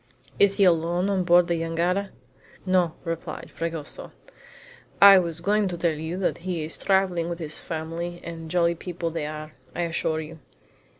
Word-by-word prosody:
"Is 200 -1 +5
he 200 - +4
alone 175 +2 +2
on 190 -2 +1
board 175 0 +5
the 170 -2 0
jangada?" 175 +4 0 0.6
"No," 180 -3 +2
replied 165 -1 -5
Fragoso. 165 -3 -5 0.9
"I 200 -1 +10
was 170 -2 -3
going 205 +2 +2
to 175 -2 -4
tell 170 -1 +1
you 160 +3 -5
that 190 - -1
he 175 -2 -3
is 155 - -4
traveling 185 -3 +1
with 170 0 -4
all 165 - -4
his 150 - +1
family 170 +2 -5
and 165 -1 -7
jolly 170 0 +2
people 170 0 -5
they 160 -2 -3
are, 155 0 -7 0.2
I - - -1
assure 160 -1 -1
you. 160 +1 -8
170 Hz, 175 wpm, -25 LUFS, 165-180 Hz, 0.9 s, I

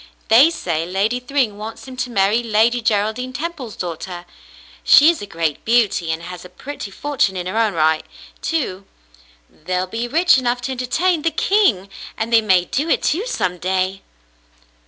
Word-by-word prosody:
They 255 +8 +7
say 170 - -2
Lady 200 +7 0
Thryng 250 -5 -1
wants 220 +4 -8
him 260 - -9
to 250 - -2
marry 210 +1 +2
Lady 230 +1 +2
Geraldine 220 +4 -1
Temple's 275 -5 -5
daughter. 175 0 -6 0.6
She 305 +4 +7
is 340 - -7
a 205 - -6
great 165 -5 -2
beauty, 220 -8 +2
and 160 +1 -4
has 180 0 -8
a 180 - -12
pretty 215 +4 -8
fortune 230 -4 -1
in 180 - -4
her 185 - -4
own 215 -5 +1
right, 155 0 +2 0.4
too. 200 - -3 0.6
They'll 180 +3 -3
be 225 +6 -4
rich 330 +2 +4
enough 245 -1 -1
to 265 - -4
entertain 310 +7 0
the 330 - +1
king! 320 - +2 0.3
And 230 +1 -3
they 225 - +6
may 185 -4 +3
do 295 - -2
it, - - +1
too, 380 +11 0
some 180 - -2
day." 185 +1 -1
220 Hz, 175 wpm, -19 LUFS, 185-260 Hz, 0.6 s, They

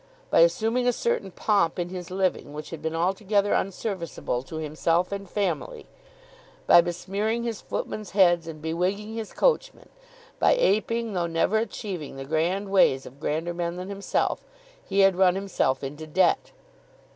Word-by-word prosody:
By - - +5
assuming 225 +9 +3
a 245 - +4
certain 230 -4 -1
pomp 190 -2 +1
in 175 -1 -2
his 180 -2 -7
living, 185 -5 -1
which 150 0 -7
had 165 -3 -7
been 160 +1 -3
altogether 200 +4 +1
unserviceable 185 - -2
to - - -8
himself 160 +3 0
and 200 -1 -5
family, 440 - -2 0.8
by 175 - +8
besmearing 195 +7 -2
his 230 -3 -3
footmen's 215 -3 -4
heads, 175 -4 +4
and 155 -2 -8
bewigging 185 +7 -1
his 225 -2 -5
coachmen, - - 0 0.5
by - - +5
aping, 230 - +1
though 175 -2 0
never 170 +6 +1
achieving, 195 - -5
the 135 0 -7
grand 175 +7 -1
ways 135 -9 +4
of 135 +3 -12
grander 160 +3 -2
men 170 0 -3
than 180 +2 -6
himself, 200 0 -1 0.4
he 200 - +1
had 195 -1 +5
run 185 -1 +4
himself 190 -9 0
into 150 +3 -6
debt. 185 +5 +2
185 Hz, 155 wpm, -26 LUFS, 165-205 Hz, 0.8 s, by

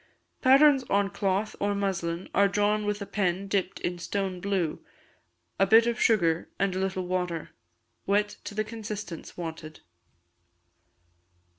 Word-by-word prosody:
Patterns 275 +1 +6
on 200 0 +1
cloth 200 +1 -1
or 205 0 0
muslin 185 -3 -2
are 200 0 +5
drawn 210 +1 +1
with 205 0 -1
a - - -7
pen 195 -1 -1
dipped 195 -2 -1
in 175 0 -3
stone 190 +1 -3
blue, 190 -5 -1 0.8
a 195 - +4
bit 225 +3 +7
of 235 0 -1
sugar 170 -8 +2
and 195 -1 0
a - - -1
little 190 -1 -2
water; 180 -3 -2 0.6
wet 205 +1 +2 0.2
to 205 - -6
the 215 - +1
consistence 210 -5 -7
wanted. 160 -2 -7
195 Hz, 140 wpm, -27 LUFS, 180-210 Hz, 0.8 s, bit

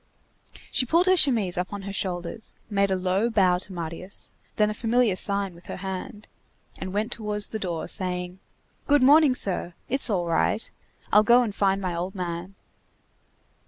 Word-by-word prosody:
She 255 - +1
pulled 335 +6 +3
her 370 0 +5
chemise 225 - +2
up 180 - -3
on 200 -1 -6
her 200 0 -6
shoulders, 180 +2 -3 0.2
made 200 -1 +2
a 190 - +1
low 190 +5 0
bow 185 -5 +3
to 190 - -5
Marius, 170 +2 -4 0.2
then 210 0 +2
a - - -3
familiar 230 -1 +1
sign 200 0 0
with 170 +1 -17
her - - -6
hand, 195 +4 -6 0.5
and 190 - -5
went 215 +4 -2
towards 210 -2 0
the 220 - -4
door, 175 -5 -3
saying:— 180 -1 -2 0.5
"Good 290 -2 +4
morning, 290 0 +6
sir. 180 -5 0
It's 270 0 +2
all 185 -5 0
right. 170 +6 0 0.4
I'll 210 - +8
go 240 +3 +5
and 215 -4 -3
find 195 -1 +1
my 185 -2 -2
old 180 +4 -4
man." 180 +1 -5
195 Hz, 175 wpm, -25 LUFS, 180-220 Hz, 0.5 s, I'll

